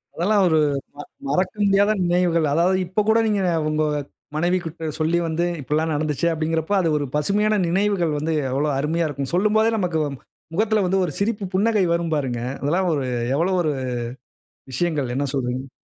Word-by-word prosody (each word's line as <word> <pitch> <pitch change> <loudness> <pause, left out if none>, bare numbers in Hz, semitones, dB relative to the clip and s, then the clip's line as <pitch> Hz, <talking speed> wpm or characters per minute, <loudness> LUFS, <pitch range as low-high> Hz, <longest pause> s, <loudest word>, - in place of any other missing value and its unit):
அதெல்லாம் 200 +5 +2
ஒரு 160 -2 +3 0.4
ம 145 - -6 0.3
மறக்க 185 0 +1
முடியாத 200 +1 +4
நினைவுகள். 175 -2 +2
அதாவது 175 +4 +3
இப்ப 190 +4 0
கூட 225 +1 +5
நீங்க 205 -2 +1 0.3
உங்க 155 0 +1 0.5
மனைவி 175 +4 +2
கிட்ட 165 0 -6
சொல்லி 160 +2 +2
வந்து, 165 +2 0 0.2
"இப்படியெல்லாம் 155 +4 0
நடந்ச்சு." 150 +1 0
அப்படீங்கிறப்போ, 160 +3 -1
அது 170 -3 +1
ஒரு 145 - -1
பசுமையான 210 +8 +2
நினைவுகள் 180 -3 +1
வந்து 155 +2 -1 0.2
எவ்வளவு 145 +3 0
அருமையா 160 +3 0
இருக்கும்! 140 -2 -4
சொல்லும்போதே 215 +4 +3
நமக்கு 175 -5 0 0.5
முகத்தில 215 +2 +2
வந்து 190 +2 +1
ஒரு 165 - -4
சிரிப்பு 205 0 -1
புன்னகை 210 0 +3
வரும் 170 -1 -1
பாருங்க. 130 -5 -2 0.2
அதெல்லாம் 175 +6 +1
ஒரு 140 -3 -1 0.3
எவ்வளவு 180 +5 +1
ஒரு 155 -2 0 1.0
விஷயங்கள். 150 -2 -1
என்ன 140 +2 0
சொல்கிறீர்ங்க? 130 0 -2
170 Hz, 160 wpm, -22 LUFS, 150-195 Hz, 1.0 s, கூட